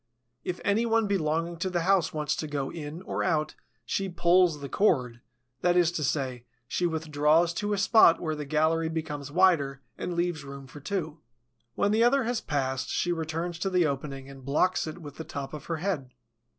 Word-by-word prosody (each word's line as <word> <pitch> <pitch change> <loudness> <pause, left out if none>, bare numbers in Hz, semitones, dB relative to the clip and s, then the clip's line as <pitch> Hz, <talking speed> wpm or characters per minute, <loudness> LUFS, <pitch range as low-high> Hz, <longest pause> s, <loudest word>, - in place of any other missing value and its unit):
If 180 - -3
any 220 +4 +2
one 225 -1 +3
belonging 170 -3 0
to 185 +3 -2
the 175 -2 0
house 185 -2 +3
wants 150 -1 -1
to 155 - -3
go 140 -2 -3
in 160 +2 -7
or - - -2
out, 155 -1 0 0.3
she 195 -1 -1
"pulls 175 -2 +3
the 140 - -6
cord," 125 - +1 0.4
that 175 0 +3
is 175 -2 +4
to 165 -3 -3
say, 130 -4 -1 0.2
she 175 +5 0
withdraws 160 +1 +2
to 205 +3 -1
a - - 0
spot 195 -4 +6
where 155 -2 -2
the 150 -1 -4
gallery 160 +2 +1
becomes 150 -3 -4
wider 145 -6 +3 0.2
and 175 - -3
leaves 170 -3 -1
room 140 0 -9
for 135 +3 -11
two. 160 -1 -3 0.6
When 205 - +2
the 220 +2 +4
other 265 +3 +4
has 240 0 -1
passed 130 -3 -2
she 175 - 0
returns 165 +1 -3
to 195 - 0
the 180 -2 +3
opening 135 -1 -3
and 135 -1 -12
blocks 155 +7 +1
it 155 +2 -6
with 145 -5 -10
the 160 - -5
top 140 -3 -6
of 150 - -7
her 165 - -2
head. 160 -7 -2
160 Hz, 200 wpm, -28 LUFS, 145-180 Hz, 0.6 s, spot